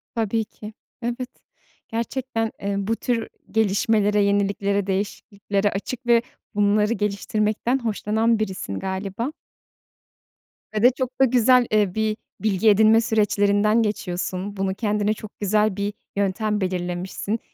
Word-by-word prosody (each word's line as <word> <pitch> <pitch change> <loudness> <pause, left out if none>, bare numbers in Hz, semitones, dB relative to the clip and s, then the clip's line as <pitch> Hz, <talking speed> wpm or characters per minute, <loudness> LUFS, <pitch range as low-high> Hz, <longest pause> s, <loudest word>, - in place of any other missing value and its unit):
Tabii 225 0 0
ki. 210 +1 -11 0.3
Evet. 240 +2 -3 0.6
Gerçekten, 230 -1 -2
eee, 200 0 -1
bu 200 +3 0
tür 230 -1 -1 0.2
gelişmelere, 210 0 +2
yeniliklere, 200 0 +1
değişikliklere 200 +1 -1
açık 240 +5 -5
ve 235 -1 +5 0.3
bunları 210 +2 +3
geliştirmekten 215 +4 0
hoşlanan 225 0 +1
birisin 185 - -3
galiba 195 +8 -3 1.4
Ve 215 - -1
de 245 - +9
çok 255 0 -4
da - - +8
güzel, 250 0 +4
ııı, 205 -4 +2
bir 220 -1 0 0.2
bilgi 215 0 +3
edinme 220 +2 +6
süreçlerinden 210 -1 +2
geçiyorsun. 195 -1 -3
Bunu 190 0 -1
kendine 210 0 0
çok 215 -1 -11
güzel 210 0 +2
bir 205 +1 -2 0.2
yöntem 205 +1 0
belirlemişsin. 185 +4 -2
210 Hz, 120 wpm, -23 LUFS, 200-225 Hz, 1.4 s, de